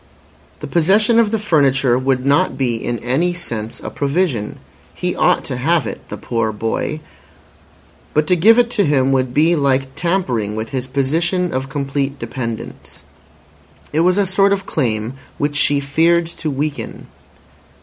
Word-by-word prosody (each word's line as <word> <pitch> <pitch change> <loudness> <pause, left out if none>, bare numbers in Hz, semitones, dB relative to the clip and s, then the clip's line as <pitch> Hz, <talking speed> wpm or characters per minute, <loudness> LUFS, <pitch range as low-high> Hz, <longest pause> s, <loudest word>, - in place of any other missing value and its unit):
The - - -4
possession 205 +7 +3
of 225 -2 +3
the 225 - 0
furniture 140 - +2
would 130 -1 0
not 145 +7 +2
be 130 -3 0
in 120 +1 -3
any 160 +9 0
sense 115 -10 -5
a 110 - -6
provision. 140 - -1 0.4
He - - -2
ought - - +2
to - - -4
have - - +1
it—the - - -7
poor 115 -2 -1
boy. 115 +8 -3 1.1
But 150 0 +3
to 180 - +3
give 220 +7 +5
it 240 -1 +3
to 210 -4 +2
him 135 -4 +2
would 130 -2 +1
be 160 +6 +3
like 135 -2 0
tampering 130 - -1
with 110 +1 -4
his 130 -2 -3
position 165 +7 0
of 130 +1 -3
complete 140 0 -2
dependence. 115 -5 -6 0.9
It 155 - +1
was 180 +3 +3
a 200 - +3
sort 195 +1 +3
of 195 -1 -3
claim 120 - -2 0.2
which 145 0 -1
she 145 0 +3
feared 165 +5 +2
to 165 -1 -5
weaken. 145 +1 -4
145 Hz, 160 wpm, -18 LUFS, 130-175 Hz, 1.1 s, give